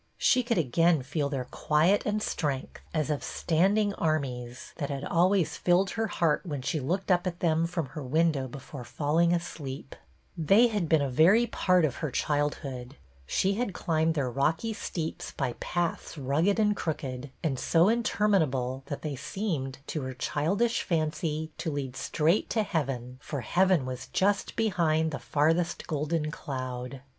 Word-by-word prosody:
She 255 - +4
could 235 -2 0
again 165 +1 +3
feel 145 +1 -1
their 135 -3 -3
quiet 155 +11 +2
and 210 0 0
strength, 140 -4 -3
as 155 -2 0
of 145 - -2
standing 200 +5 +1
armies, 130 -8 -2
that 145 -4 -3
had 140 -1 -4
always 175 -1 +2
filled 185 +2 +2
her 225 0 -1
heart 165 -7 +1
when 145 -8 -4
she 155 +3 -1
looked 185 +9 -1
at 175 -1 +1
them 165 -1 +2
from 170 -2 -2
her 150 - -7
window 145 0 +1
be 130 - -8
fore 135 -1 -9
falling 155 +7 +1
asleep. 160 -5 -4
TIGHT - - -12
PAPERS'' 160 -4 -11
1 195 - +7
1 - - +7
They 240 - +7
had 205 -7 -1
been 160 -3 +4
a 140 - -1
very 185 - +5
part 180 -6 +2
of 140 - -2
her 155 - -2
childhood; 140 -2 -2 0.3
she 195 - +1
had 205 -3 -2
climbed 160 0 +1
their 135 -5 0
rocky 160 - 0
steeps 165 -6 -5
by 120 - -2
paths 175 -1 -2
rugged 150 +9 +1
and 210 -1 +3
crooked, 140 -6 -4
and 135 -6 0
so 165 +2 +4
interminable 185 - +1
that 145 - -5
they 150 -3 -3
seemed, 145 -3 -3
to 155 - -3
her 130 -1 -5
childish 195 - 0
fancy, 155 -1 -1
to - - -2
lead 140 -4 -4
straight 155 +7 +1
to 220 - +1
heaven, 130 - -3
for 145 -4 -4
heaven 180 - +3
was 130 0 -5
just 200 +1 0
behind 165 -8 +1
the 150 - -4
farthest 165 +4 +1
golden 155 0 -1
cloud. 130 -2 -5
155 Hz, 170 wpm, -28 LUFS, 140-180 Hz, 0.3 s, 1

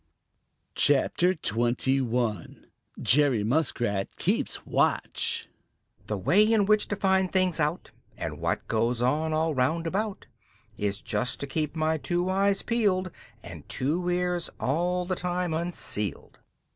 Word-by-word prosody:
CHAPTER 170 +6 +3
XXI: 120 - -1 0.4
Jerry 135 -5 +3
Muskrat 115 -6 0
Keeps - - -1
Watch - - 0 0.6
"The 105 - -2
way 175 - +4
in 215 -2 +3
which 215 +1 +3
to 205 - -2
find 190 -1 +2
things 185 -2 +2
out, 150 +3 -1 0.3
And - - -5
what - - -2
goes 115 +2 0
on 155 +5 +1
all 160 +1 +1
round 150 +6 0
about, 200 +4 -2 0.5
Is 100 0 -3
just 125 - -1
to - - -1
keep 150 +2 -2
my 160 0 0
two 175 +3 -1
eyes 195 +1 +1
peeled 195 -6 +1 0.3
And 85 -4 -10
two 165 +7 -1
ears 180 -1 -1
all 175 +6 0
the 185 - -1
time 180 -1 -2
unsealed." 160 - -4
160 Hz, 130 wpm, -27 LUFS, 125-180 Hz, 0.6 s, way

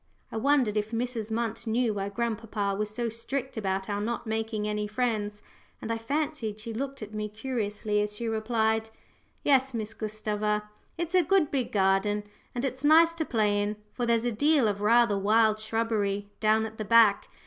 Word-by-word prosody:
I - - -4
wondered 250 -3 +2
if 210 0 -1
Mrs. 230 -1 -3
Munt 225 0 -2
knew 230 0 +1
why 200 -1 -3
grandpapa 220 -2 -2
was 210 +1 -2
so 235 +2 -2
strict 250 +4 -4
about 190 -3 -2
our 205 -1 -2
not 235 +3 -3
making 220 -1 -2
any 210 0 -1
friends; 210 -2 -2 0.4
and 225 - -4
I 225 - -1
fancied 255 -4 -2
she 225 +1 -6
looked 270 +1 -4
at 215 0 -9
me 210 0 -3
curiously 210 -2 -2
as 210 0 -3
she 235 +2 -4
replied 220 0 0 0.5
"Yes, 265 -2 +3
Miss 220 -1 -4
Gustava; 210 -1 -2 0.3
it's 340 +1 -3
a 365 - +6
good 360 -2 +2
big 260 -4 -1
garden, 195 +1 +2 0.3
and 245 +2 -1
it's 260 0 -4
nice 325 +3 +6
to 330 -1 -2
play 210 -5 +1
in, 205 +1 -1 0.2
for 240 -1 -2
there's 235 0 +2
a 240 - +1
deal 285 +2 +3
of 205 -1 -2
rather 220 -1 +4
wild 215 +2 +3
shrubbery 215 -2 -1
down 220 0 +3
at 220 0 -9
the 215 - -2
back. 220 -1 +5
220 Hz, 185 wpm, -28 LUFS, 210-240 Hz, 0.5 s, a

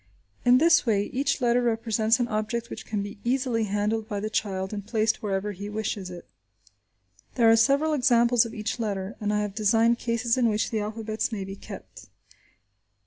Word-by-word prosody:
In 245 +1 +6
this 330 +4 +5
way 210 -4 +1
each 275 +1 0
letter 240 0 +3
represents 225 0 +1
an 240 - +1
object 230 +2 -2
which - - -8
can 210 -2 -2
be 200 0 -8
easily 245 -2 0
handled 210 +2 -1
by 205 -2 -2
the 215 +1 -4
child 190 -2 -2
and 205 -1 -4
placed 220 +1 0
wherever 200 0 -2
he 200 +1 -7
wishes 210 -3 -3
it. 175 -1 -9 1.1
There 230 -3 +5
are - - +7
several 280 +7 +3
examples 245 -3 +4
of 230 -1 -7
each 220 +3 -3
letter, 200 -2 -3
and 210 0 0
I 210 0 +1
have 205 -1 -3
designed 225 +3 +3
cases 235 +1 0
in 235 -2 +3
which 215 0 -1
the 220 - 0
alphabets 215 +2 -3
may 205 -3 -3
be 195 0 -7
kept. - - -11
220 Hz, 190 wpm, -26 LUFS, 210-235 Hz, 1.1 s, are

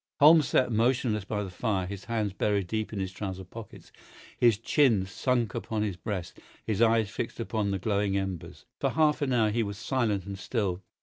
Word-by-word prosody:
Holmes 155 0 +7
sat 125 - +2
motionless 115 -2 +1
by 105 0 -2
the 95 - -7
fire, 95 -1 -1
his 95 +1 -7
hands 110 -4 -1
buried 100 -1 0
deep 110 +4 -3
in 105 - -5
his 95 -1 -2
trouser 95 -1 -5
pockets, 110 +3 -11 0.4
his 115 -4 +4
chin 115 -4 +3
sunk 120 +4 0
upon 110 -2 -2
his 100 -4 -2
breast, 90 -1 -5 0.3
his 110 -1 -1
eyes 115 -3 +3
fixed 115 - -4
upon 110 -3 -1
the 100 - 0
glowing 100 0 0
embers. 90 -3 -5
For - - +1
half 155 -1 +2
an 140 -2 0
hour 110 -4 +3
he 115 +2 +1
was 100 -2 -3
silent 110 -6 -1
and 100 -1 -6
still. 95 -5 -2
105 Hz, 195 wpm, -28 LUFS, 95-115 Hz, 0.4 s, Holmes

